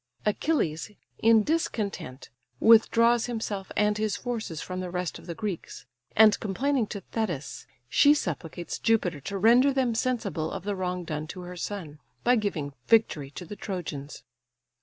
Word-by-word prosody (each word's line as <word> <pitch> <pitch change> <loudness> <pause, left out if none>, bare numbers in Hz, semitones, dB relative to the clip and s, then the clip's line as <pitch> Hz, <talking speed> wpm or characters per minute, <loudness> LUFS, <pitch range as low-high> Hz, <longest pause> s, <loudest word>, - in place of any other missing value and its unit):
Achilles 205 - 0 0.3
in 225 -1 +5
discontent 200 - -2 0.3
withdraws 230 +1 +5
himself 215 -5 -4
and 210 0 +2
his 215 -2 0
forces 225 -10 -4
from 185 0 -5
the 185 -1 -4
rest 180 -1 -3
of - - -15
the 170 - -5
Greeks; 190 - -5 0.3
and 215 -1 +6
complaining 245 +4 0
to 200 - -6
Thetis, 175 - -3 0.2
she 285 - +5
supplicates 170 - -4
Jupiter 180 -9 +1
to 200 +7 -4
render 240 +7 +5
them 260 -3 +1
sensible 220 -9 -1
of - - -5
the 205 0 -2
wrong 180 -1 -2
done 155 -2 -4
to 180 - -7
her 180 0 -8
son, 170 -5 -6 0.2
by 245 +1 +5
giving 175 - -2
victory 185 -11 +3
to 180 +5 -8
the 205 - -8
Trojans. 170 -8 -6
200 Hz, 155 wpm, -27 LUFS, 170-225 Hz, 0.3 s, and